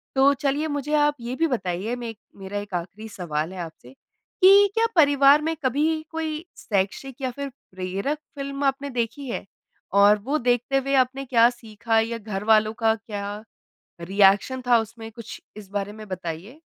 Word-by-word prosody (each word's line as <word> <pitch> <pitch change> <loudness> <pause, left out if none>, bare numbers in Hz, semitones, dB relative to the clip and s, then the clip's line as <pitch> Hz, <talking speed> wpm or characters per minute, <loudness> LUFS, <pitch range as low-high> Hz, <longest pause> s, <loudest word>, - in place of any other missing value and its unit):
तो 275 +1 +5
चलिए, 285 +2 -1
मुझे 290 0 -3
आप 295 0 +3
ये 240 +2 -4
भी 330 +2 +1
बताइए, 205 - -2
मे 235 -2 -6 0.2
मेरा 195 +1 -6
एक 205 -2 -9
आखरी 185 +5 -5
सवाल 170 -3 -3
है 185 - -8
आपसे, 160 -7 -9
कि 395 - +3
क्या 455 +1 +3
परिवार 285 -1 +6
में 325 +1 -1
कभी 310 +5 +1
कोई 320 0 -4
शैक्षिक 225 +7 -2
या 260 -1 -1
फ़िर 280 +2 -5 0.2
प्रेरक 190 +10 -3 0.2
फ़िल्म 275 0 -4
आपने 275 +1 0
देखी 245 +3 -3
है? - - -4 0.5
और 200 +1 +6
वो 285 +5 0
देखते 245 +1 +1
हुए 275 +1 -1
आपने 265 +1 +1
क्या 235 -1 +5
सीखा 225 -1 -1
या 230 +1 -1
घरवालों 215 +1 +1
का 220 0 +5
क्या 210 -2 -6 0.6
रिएक्शन 200 +7 +3
था 240 -1 +5
उसमें, 225 0 -8
कुछ 230 -1 -9 0.2
इस 205 -3 -10
बारे 205 0 -3
में 215 0 -10
बताइए? 185 - -6
235 Hz, 170 wpm, -24 LUFS, 205-280 Hz, 0.6 s, परिवार